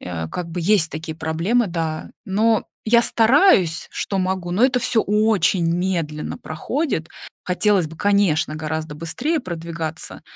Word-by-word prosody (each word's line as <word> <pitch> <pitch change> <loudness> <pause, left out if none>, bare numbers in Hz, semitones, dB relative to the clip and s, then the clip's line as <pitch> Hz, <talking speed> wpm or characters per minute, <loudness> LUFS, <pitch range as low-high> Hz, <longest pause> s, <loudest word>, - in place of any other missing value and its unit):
э, 85 -2 -5
как 170 - -5
бы 175 +2 -4
есть 170 -2 +3
такие 160 0 -6
проблемы, 165 +9 0
да. 165 -2 -3
Но 215 +3 +2 0.2
я 235 +1 +4
стараюсь, 225 - +4
что 195 - -3
могу, 185 -1 -1
но 195 +8 +3
это 255 -1 +3
всё 230 -1 +2
очень 205 -4 +2
медленно 170 -5 -2
проходит. 165 - -3 0.4
Хотелось 185 -1 +2
бы, 160 - -11
конечно, 195 -6 +2
гораздо 155 -1 -4
быстрее 165 - -2
продвигаться. 165 -4 -6
175 Hz, 140 wpm, -21 LUFS, 160-215 Hz, 0.4 s, я